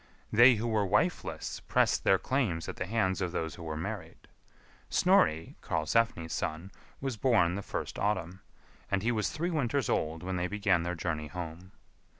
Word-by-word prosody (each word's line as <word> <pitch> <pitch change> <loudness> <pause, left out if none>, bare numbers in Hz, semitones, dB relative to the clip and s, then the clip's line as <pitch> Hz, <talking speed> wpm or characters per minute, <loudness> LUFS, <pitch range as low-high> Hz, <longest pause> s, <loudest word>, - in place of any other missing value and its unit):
They 120 +3 +8
who 115 +2 -2
were 110 -2 +1
wifeless 105 - -1
pressed - - +1
their 95 - +5
claims 105 -10 -1
at - - -6
the 90 - -3
hands 95 -3 0
of 90 -2 -1
those 80 -2 -3
who - - -11
were 80 -2 -4
married. 100 +6 -6 0.6
Snorri, 80 +1 +3
Karlsefni's 80 0 0
son, 85 +2 -3 0.3
was 135 -4 -3
born 105 -8 +3
the 100 - -3
first - - -5
autumn, 95 -3 -1 0.5
and 100 -1 0
he 120 - +2
was 110 -3 0
three 160 +3 -2
winters 140 -4 0
old 80 +2 -1
when 95 0 -2
they 90 0 0
began 100 -2 +1
their 90 +1 -2
journey 80 -2 -3
home. 85 +3 -7
95 Hz, 170 wpm, -30 LUFS, 85-115 Hz, 0.6 s, They